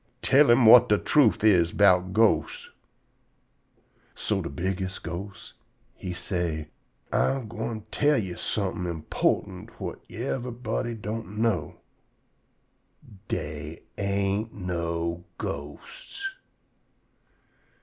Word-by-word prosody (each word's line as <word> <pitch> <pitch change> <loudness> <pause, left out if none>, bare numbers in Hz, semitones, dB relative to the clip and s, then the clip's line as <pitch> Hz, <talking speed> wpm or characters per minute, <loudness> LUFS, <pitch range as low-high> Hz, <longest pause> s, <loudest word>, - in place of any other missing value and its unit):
"Tell 140 +1 +5
him 120 +1 +6
whut 115 +1 +9
de 105 - +5
truth 125 -2 +3
is 90 -6 +4
'bout 95 -2 +4
ghosts." 110 +2 +1 1.4
So 100 -3 -1
de 85 - -5
bigges' 95 +1 -3
ghost 90 +4 -7 0.4
he 90 - -6
say: 85 -4 -3 0.4
"Ah 135 0 +2
gwine 115 -1 -5
tell 145 0 +3
yo' 95 -6 -2
somethin' 100 -3 -2
important 80 -2 -1
whut - - -6
yever'body 120 0 -3
don't 110 -1 -6
know: 115 0 0 1.5
Dey 75 +2 -5 0.2
ain't 100 +2 0
no 85 -2 -3
ghosts." 395 -1 -6
100 Hz, 95 wpm, -26 LUFS, 90-115 Hz, 1.5 s, whut